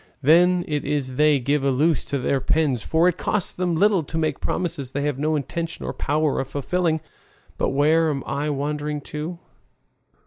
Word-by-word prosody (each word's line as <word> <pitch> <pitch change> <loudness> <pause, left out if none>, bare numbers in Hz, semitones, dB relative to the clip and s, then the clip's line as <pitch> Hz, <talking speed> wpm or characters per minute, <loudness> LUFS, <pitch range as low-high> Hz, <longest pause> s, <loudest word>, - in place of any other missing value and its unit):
Then 175 +4 +5
it 150 -1 -1
is 140 -3 -2
they 150 +1 +4
give 140 +2 0
a 140 - +2
loose 150 +4 +2
to 140 - -2
their 135 +1 0
pens, 140 -3 +1
for 165 +8 +2
it 180 -1 0
costs 210 -4 0
them 180 -2 -1
little 200 +1 +3
to 160 +1 -6
make 155 -3 -1
promises 165 -7 -2
they 145 - -1
have 145 -2 -1
no 155 +2 +1
intention 165 +4 -4
or - - -3
power 155 -1 0
of 135 - -2
fulfilling. 160 +3 -1 0.6
But - - +1
where 155 +4 +3
am 140 -3 -2
I 145 +2 -2
wandering 150 +1 -2
to? 155 +3 -4
150 Hz, 185 wpm, -23 LUFS, 140-165 Hz, 0.6 s, Then